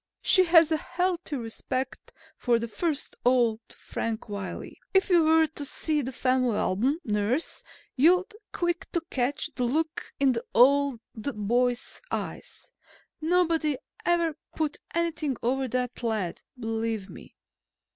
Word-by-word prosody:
"She 370 -2 +5
has 330 -2 +6
a 315 - +3
healthy 355 -1 -2
respect 255 +2 -4 0.2
for 240 -2 +2
the 230 0 -3
first 295 +7 -2
old 240 -3 +3
Frank 225 0 -4
Wiley. 200 -2 -6 0.2
If 385 0 +4
you 345 -2 +6
were 320 0 +5
to 310 -2 -7
see 300 +2 0
the 260 0 -4
family 255 -3 +1
album, 245 +11 +1
nurse, 210 +8 -1 0.3
you'd 355 +7 +4
be 425 - -15
quick 345 +2 -2
to 340 - +1
catch 280 +4 0
the 250 - -1
look 310 +6 -1
in 275 -1 +4
the 230 -2 -2
old 275 0 +5
boy's 240 +1 -1
eyes. - - -6 0.5
Nobody 325 -3 +2 0.3
ever 340 -3 +2 0.2
put 310 -2 -1 0.2
anything 315 -6 0
over 265 +3 +1
on - - -5
that 250 0 -2
lad, 215 -7 -2 0.2
believe 225 -3 -2
me." - - -13
270 Hz, 140 wpm, -27 LUFS, 235-320 Hz, 0.5 s, has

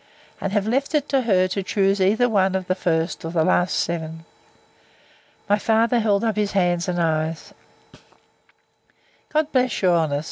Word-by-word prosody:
And 195 - -2
have 205 0 0
left 270 +6 0
it 295 -1 0
to 270 -1 +2
her 190 -6 +2
to 195 - -2
choose 195 +1 0
either 215 +6 +3
one 190 -4 +1
of 190 -1 -2
the 185 - 0
first 165 -2 -2
or 165 - -4
last 175 +2 +1
seven. 165 -1 -3 1.2
My 205 +1 +2
father 230 +3 +2
held 210 -1 +1
up 220 -2 -1
his 210 -1 -1
hands, 175 -2 +1
and 175 -1 -2
eyes; 160 -1 -2 1.8
God 310 0 0
bless 255 -4 +1
your 180 -2 +4
honour! 155 -4 0
195 Hz, 165 wpm, -22 LUFS, 170-220 Hz, 1.8 s, your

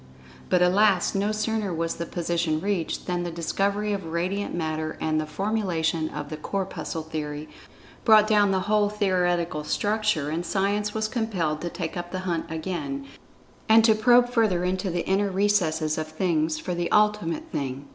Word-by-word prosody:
But 180 -1 +4
alas! 190 0 +3
no 200 +2 0
sooner 215 -2 -1
was 165 0 -2
this 170 - -5
position 170 -2 -1
reached, 190 -2 -2
than 180 -1 -1
the 175 - -3
discovery 200 +5 -1
of 195 -2 -3
Radiant 180 +5 -2
Matter 155 -2 -3
and 155 -1 0
the 155 - -5
formulation 170 -5 -1
of 145 -1 -6
the 155 - -5
"Corpuscle 165 -2 -4
Theory" 150 -1 -5 0.6
brought 215 -2 +7
down 210 -2 +4
the 190 -1 +1
whole 205 +1 +2
theoretical 180 -6 0
structure, 205 -2 0
and 165 +2 -2
Science 205 +2 0
was 220 0 0
compelled 195 -10 -1
to 175 - -3
take 170 -2 -5
up 175 0 -5
the 185 - -3
hunt 170 -3 -2
again, 155 -4 -4 0.6
and 220 0 +7
to 220 - +6
probe 245 +3 +5
further 220 -7 +2
into 185 +1 -1
the 175 -1 -2
inner 195 +1 +2
recesses 175 -6 +1
of 155 - -3
Things 155 -1 0
for 180 +3 -4
the 175 0 -2
Ultimate 210 -6 +1
Thing. 135 0 -4
180 Hz, 170 wpm, -25 LUFS, 160-205 Hz, 0.6 s, brought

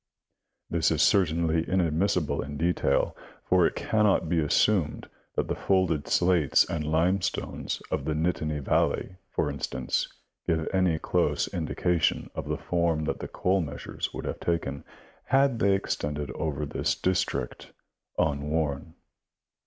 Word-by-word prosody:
This 85 -1 +1
is 80 -2 +2
certainly 85 -4 +3
inadmissible 85 -3 +1
in 70 +1 -6
detail, 85 +3 +1 0.3
for 90 -2 +4
it - - -5
can 110 -1 +1
not 100 -5 +3
be 85 0 +1
assumed 80 +3 +2 0.3
that - - 0
the - - 0
folded 90 -6 +1
slates 85 -6 +3
and 85 -3 -2
limestones 90 +4 0
of - - -1
the 80 - 0
Nittany 75 -2 -1
vailey, 90 - 0
for 75 - 0
instance, 70 -3 -2 0.4
give 80 -1 +1
any 90 -4 +3
close - - +1
indication 85 -4 0
of - - -5
the - - -1
form 85 -2 0
that 80 - -2
the - - -5
coal 95 +1 +1
measures 75 - -5
would - - -6
have - - -4
taken, 75 -5 -2 0.4
had 135 -3 +3
they 100 -2 +4
extended 75 -7 -3
over 75 +1 -2
this - - -1
district, 95 0 -2 0.5
unworn. 75 +1 -1
80 Hz, 135 wpm, -27 LUFS, 75-90 Hz, 0.5 s, for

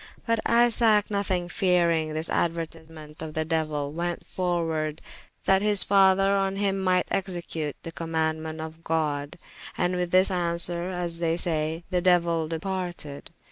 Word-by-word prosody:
But 230 -1 +1
Isaac 230 -3 +4
nothyng 190 -3 0
feareyng 170 -4 +2
this 155 +1 -2
aduertisement 160 -2 -4
of 155 -1 -6
the 160 0 0
Deuyl, 155 -3 -1
went 170 +2 -3
forward, 165 -4 -1 0.5
that 190 0 +4
his 210 -1 +3
father 195 0 +4
on 195 0 0
hym 195 -1 0
myght 185 -1 +3
execute 170 -6 -3
the 165 - -6
commaundement 160 -1 -2
of 160 +1 -8
God: 150 -3 -1 0.4
and 180 +1 +1
with 180 -1 -1
this 185 +2 +4
answere 170 0 0
(as 175 -2 -3
they 165 -1 +1
saye) 160 -1 -1
they 180 -1 +1
Deuyell 170 -3 +2
departed. 175 -4 -4
170 Hz, 140 wpm, -26 LUFS, 160-185 Hz, 0.5 s, Isaac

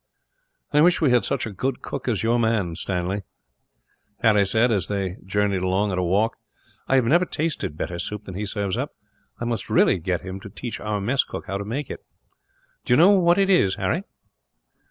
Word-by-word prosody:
"I 150 - +5
wish 175 +2 +5
we 150 -6 +3
had 125 -1 +3
such - - -1
a 110 - -5
good 130 +6 -3
cook - - -5
as 110 -5 0
your 115 +2 +2
man 110 -6 +1
is, 80 - -6
Stanley," 95 +2 -2 1.0
Harry 105 -3 +4
said, 115 +4 +2
as 95 -6 +1
they 95 -3 -2
journeyed 100 -1 +1
along 95 +3 +1
at 90 - -1
a - - 0
walk. 100 +6 +1 0.5
"I 135 - +4
never 155 +10 +3
tasted 155 - -3
better 85 +1 -4
soup 105 +3 -4
than 95 - -8
he 100 +3 -4
serves 100 -2 -2
up. - - -4 0.4
I 120 - -3
must 115 -2 -3
really - - +4
get 90 +1 -2
him 95 +1 -7
to 100 - -10
teach 115 +3 -6
our 105 -1 -2
mess 125 +7 +1
cook - - -7
how 100 +1 -3
to 100 - -5
make 130 +6 -4
it." - - -8 0.8
"Do - - +1
you - - +5
know 175 +6 +7
what 175 -3 +4
it 195 0 +3
is, 100 - +4
Harry?" - - -1
105 Hz, 210 wpm, -23 LUFS, 95-125 Hz, 1.0 s, know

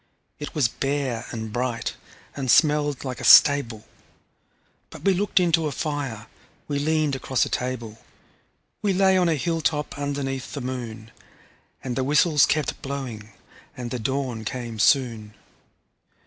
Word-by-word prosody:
It 150 - -7
was 145 -6 +3
bare 135 -2 -2
and 110 -2 -6
bright, 120 -1 -2 0.4
and 135 -2 -4
smelled 150 -1 +3
like 130 -2 -5
a - - -7
stable 120 -7 +6 1.0
But - - -12
we 195 - +5
looked 200 +1 +1
into 165 -3 +2
a - - -3
fire, 140 -8 -4 0.4
we 145 -1 -1
leaned 155 -1 +1
across 130 -1 0
a - - -6
table, 120 -3 -4 0.8
We 205 -2 +1
lay 190 0 +4
on 180 -2 +3
a 160 - +2
hilltop 155 -1 -1
underneath 140 -2 -3
the 145 - -4
moon; 120 -3 -6 0.7
And 125 -2 -3
the 130 - 0
whistles 150 +1 +4
kept 155 -2 -1
blowing, 125 -6 -6 0.5
and 120 -2 -6
the 125 - -3
dawn 130 -2 -2
came 115 -1 -5
soon. 115 -4 +2
135 Hz, 145 wpm, -24 LUFS, 120-150 Hz, 1.0 s, stable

